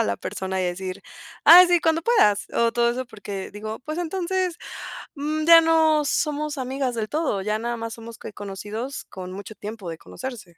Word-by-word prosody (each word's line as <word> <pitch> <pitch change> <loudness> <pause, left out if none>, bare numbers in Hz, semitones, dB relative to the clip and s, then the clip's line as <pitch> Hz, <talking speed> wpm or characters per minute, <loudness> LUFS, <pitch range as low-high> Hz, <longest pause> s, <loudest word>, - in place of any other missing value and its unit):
a - - +3
la 100 -1 -1
persona 190 - -4
y - - 0
decir: 185 +2 -4 0.4
"Ay, 360 +2 +10
sí, 350 -1 +4
cuando 325 0 +1
puedas". 320 - +3
O 230 0 +2
todo 235 0 +2
eso, 255 +2 -3
porque 205 -4 -7
digo, 215 +2 -6
pues, 310 +5 -5
entonces, 365 +1 -1 0.6
mm, 305 +2 -2
ya 335 0 +9
no 320 -2 +4
somos 300 +1 -1
amigas 260 -1 -2
del 215 -1 -3
todo, 300 -10 -1
ya 210 +2 -1
nada 235 +1 -3
más 230 0 -5
somos, 230 0 -10
¿qué? 210 - -9
Conocidos, 210 +6 -6
con 185 -1 -8
mucho 200 +3 -8
tiempo 210 -3 -7
de 165 - -6
conocerse. 215 -10 -9
235 Hz, 195 wpm, -24 LUFS, 205-310 Hz, 0.6 s, Ay